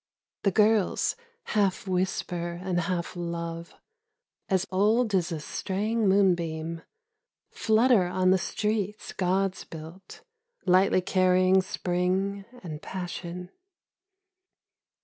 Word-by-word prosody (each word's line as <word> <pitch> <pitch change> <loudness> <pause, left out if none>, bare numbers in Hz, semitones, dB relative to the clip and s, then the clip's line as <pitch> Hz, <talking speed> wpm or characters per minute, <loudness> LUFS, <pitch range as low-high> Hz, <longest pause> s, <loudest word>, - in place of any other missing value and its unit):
The 200 - +3
girls, 215 -1 +2 0.3
half 200 -2 0
whisper 180 -2 -2
and 180 -2 0
half 175 0 -2
love, 170 -1 -5 0.7
As 190 -1 +2
old 215 +4 +2
as 180 -3 +1
a 160 - -3
straying 210 +7 -1
moonbeam, 170 -4 +1 0.7
Flutter 220 -3 +3
on 185 +1 +2
the 190 - +4
streets 210 +2 -2
gods 190 0 0
built, 165 +4 -11 0.4
Lightly 185 0 +4
carrying 185 0 +3
Spring 185 +2 -1 0.2
and 155 -3 -6
passion. 180 -1 -6
185 Hz, 95 wpm, -27 LUFS, 175-195 Hz, 0.7 s, the